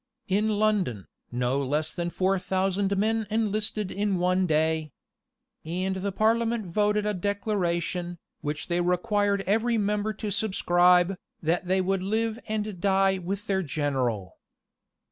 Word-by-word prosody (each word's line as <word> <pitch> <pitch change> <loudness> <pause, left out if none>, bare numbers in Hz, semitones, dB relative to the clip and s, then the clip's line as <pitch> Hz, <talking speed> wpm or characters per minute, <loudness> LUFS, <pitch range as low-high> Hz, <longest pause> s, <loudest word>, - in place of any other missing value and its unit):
In 210 +2 +1
London, 195 - +1 0.3
no 125 +3 0
less 150 +4 -1
than 175 -1 -2
four 190 +2 +1
thousand 195 +1 0
men 220 +1 +1
enlisted 215 -2 -1
in 200 -1 0
one 180 +1 +2
day.[] 160 -1 +1 0.7
And 185 +4 -2
the 200 +1 -2
parliament 225 +2 +1
voted 210 +3 +1
a 210 - +1
declaration, 180 -3 -1 0.2
which 150 0 -4
they 175 0 +1
required 200 +3 +1
every 225 +4 +2
member 210 0 0
to 210 -1 -4
subscribe, 180 -3 +3 0.3
that 175 +3 0
they 190 +1 +2
would 190 0 0
live 220 +3 -1
and 210 -4 -3
die 195 -1 +3
with 195 +4 -4
their 195 -2 +1
general. 130 - -2
190 Hz, 135 wpm, -27 LUFS, 175-210 Hz, 0.7 s, subscribe